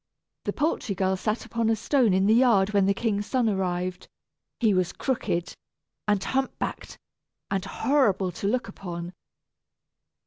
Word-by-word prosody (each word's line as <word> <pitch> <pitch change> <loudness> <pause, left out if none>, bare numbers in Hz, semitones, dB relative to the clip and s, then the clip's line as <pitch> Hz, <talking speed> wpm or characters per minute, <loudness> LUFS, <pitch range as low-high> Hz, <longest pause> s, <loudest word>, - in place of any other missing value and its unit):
The - - -1
poultry 290 -9 -1
girl 190 +1 +1
sat 215 +4 -2
upon 230 -1 0
a 225 - +3
stone 245 0 +2
in 190 +1 +3
the 215 - +5
yard 220 -5 +4
when 200 -1 +4
the 200 - +4
king's 205 -2 -1
son 255 -3 +1
arrived; 185 -2 -2 0.5
he 220 -4 +3
was 185 -2 +1
crooked, 175 -9 -2 0.5
and 205 -2 +2
hump 265 0 -1
backed, - - -5 0.5
and 195 -2 0
horrible 200 -4 +1
to 185 +3 -4
look 245 +2 0
upon. 175 -3 -7
200 Hz, 150 wpm, -26 LUFS, 190-230 Hz, 0.5 s, the